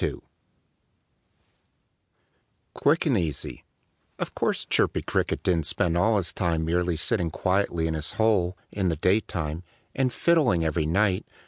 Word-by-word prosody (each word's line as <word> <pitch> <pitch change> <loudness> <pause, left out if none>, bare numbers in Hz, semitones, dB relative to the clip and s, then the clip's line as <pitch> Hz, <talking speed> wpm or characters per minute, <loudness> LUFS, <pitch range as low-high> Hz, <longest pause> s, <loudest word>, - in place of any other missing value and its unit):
II - - 0 2.6
QUICK 155 +5 +2
AND 130 -9 +2
EASY 80 -5 -4 0.5
Of - - -4
course - - -1
Chirpy - - +1
Cricket - - -1
didn't 85 -4 +1
spend 85 0 +1
all 110 +5 +3
his 90 -6 -2
time 85 -3 -1
merely 85 +1 0
sitting 90 +2 0
quietly 90 -1 0
in 80 - -1
his 80 -1 0
hole, 100 -5 +1
in 95 -3 -1
the 80 - 0
daytime 85 -3 -1 0.3
and 130 -2 0
fiddling 125 - +2
every 80 0 0
night. 95 +2 +1
90 Hz, 135 wpm, -26 LUFS, 80-105 Hz, 2.6 s, all